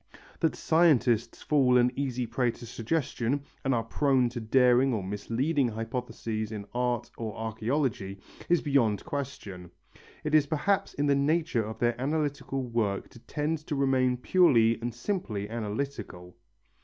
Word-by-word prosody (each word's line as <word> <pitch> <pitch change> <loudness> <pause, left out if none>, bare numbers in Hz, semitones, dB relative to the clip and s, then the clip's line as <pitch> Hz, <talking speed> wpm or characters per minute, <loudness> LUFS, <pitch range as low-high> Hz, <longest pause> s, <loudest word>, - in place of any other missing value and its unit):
That 160 -3 +1
scientists 125 -9 +2
fall 130 -4 +4
an 125 0 +4
easy 130 -3 -2
prey 120 +2 0
to 120 +1 -7
suggestion 125 +2 -1 0.2
and 135 - +1
are 115 - 0
prone 130 +1 +2
to 120 0 -5
daring 125 +2 +4
or 100 - -3
misleading 120 - 0
hypotheses 115 -1 -4
in 105 -2 -5
art 125 -1 -1
or 110 -2 -4
archæology 110 -3 -2 0.3
is 175 -1 +4
beyond 125 -8 +2
question. 130 - -6 0.5
It 150 0 -3
is 150 -2 +5
perhaps 190 +7 0
in 145 - 0
the 140 - +4
nature 145 -3 +1
of 110 +1 -6
their 120 0 0
analytical 145 -2 -1
work 115 -5 -1
to 120 - -15
tend 150 +5 -2
to 150 - -1
remain 130 -2 +2
purely 120 -7 +4
and 120 +1 -2
simply 120 - -3
analytical. 110 -5 -5
125 Hz, 145 wpm, -28 LUFS, 115-140 Hz, 0.5 s, is